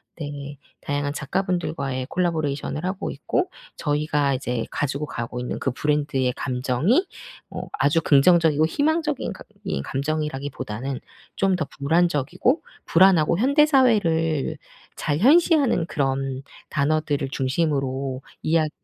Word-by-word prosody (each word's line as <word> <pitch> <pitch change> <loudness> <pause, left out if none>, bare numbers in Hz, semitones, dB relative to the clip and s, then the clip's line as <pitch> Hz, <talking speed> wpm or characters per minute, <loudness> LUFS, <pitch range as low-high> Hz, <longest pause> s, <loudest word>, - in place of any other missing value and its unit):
네. 145 -2 -7 0.2
다양한 145 0 -2
작가 150 +5 -1
분들과의 140 -8 -2
콜라보레이션을 155 -2 -1
하고 185 +2 -3
있고, 365 - -1 0.3
저희가 145 -2 +1
이제 125 -2 -2
가지고 145 +1 -2
가고 120 0 -5
있는 125 - -3
그 135 - -1
브랜드의 145 -2 0
감정이 130 - +1 0.4
어 - - -5 0.2
아주 145 +4 +3
긍정적이고 155 +1 +4
희망적인 300 - 0
가 - - -12 0.2
이 195 - -2
감정이라기보다는 135 -4 -3 0.4
좀 195 -1 +2
더 155 -4 -1
불안적이고 170 - +1 0.2
불안하고 170 -2 +4
현대사회를 225 - +3 0.4
잘 145 - -1
현시하는 280 - +4
그런 135 -2 -1 0.3
단어들을 145 -2 0
중심으로 135 -2 -1 0.2
이야기 160 -1 +2
150 Hz, 310 characters per minute, -23 LUFS, 135-180 Hz, 0.4 s, 긍정적이고